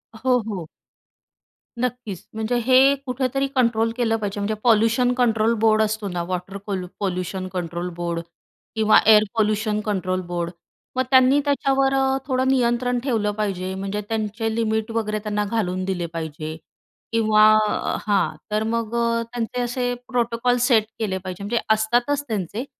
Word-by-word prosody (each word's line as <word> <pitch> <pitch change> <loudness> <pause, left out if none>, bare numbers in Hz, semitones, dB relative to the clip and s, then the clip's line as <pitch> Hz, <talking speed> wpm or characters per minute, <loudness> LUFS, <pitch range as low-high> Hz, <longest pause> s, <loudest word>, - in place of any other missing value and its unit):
हो, 250 +2 +2
हो. 185 -7 -5 1.1
नक्कीच, 240 -6 -4
म्हणजे 220 +2 -1
हे 265 +2 +6
कुठेतरी 260 +2 -1
कंट्रोल 230 -2 +2
केलं 225 -2 +1
पाहिजे. 205 -1 -4
म्हणजे 205 +2 -1
पॉल्यूशन 230 +2 +3
कंट्रोल 230 -2 +2
बोर्ड 220 0 +4
असतो 215 -1 -1
ना, 175 -2 -3
water 185 +2 -4
Paul 190 -3 -2
pollution 185 -1 -3
control 175 0 -3
board 170 -1 -2 0.6
किंवा 215 -1 +5
एअर 215 -1 +7
पॉल्यूशन 215 0 +1
कंट्रोल 185 -3 -1
बोर्ड. 175 -1 -3 0.4
मग 260 - +2
त्यांनी 260 +2 +6
त्याच्यावर 275 -1 +2
अ, 265 0 +2
थोडं 260 -1 +1
नियंत्रण 245 -1 +1
ठेवलं 220 -6 0
पाहिजे. 190 -3 -3
म्हणजे 195 +2 -3
त्यांचे 220 0 -2
लिमिट 220 -1 -1
वगैरे 215 -2 -1
त्यांना 210 -1 -1
घालून 185 -4 -1
दिले 180 -3 -2
पाहिजे 155 -1 -5 0.6
किंवा 215 -2 +4 0.6
हां, 200 -6 +1 0.2
तर 215 +1 +1
मग 230 0 -2
अ, 230 0 +1
त्यांचे 240 +1 -2
असे 245 0 -1
प्रोटोकॉल 245 0 +1
सेट 225 -5 +4 0.2
केले 195 -4 -1
पाहिजे, 185 +1 -7
म्हणजे 230 +3 0
असतातच 240 +6 +1
त्यांचे 215 - -3
220 Hz, 145 wpm, -22 LUFS, 195-245 Hz, 1.1 s, एअर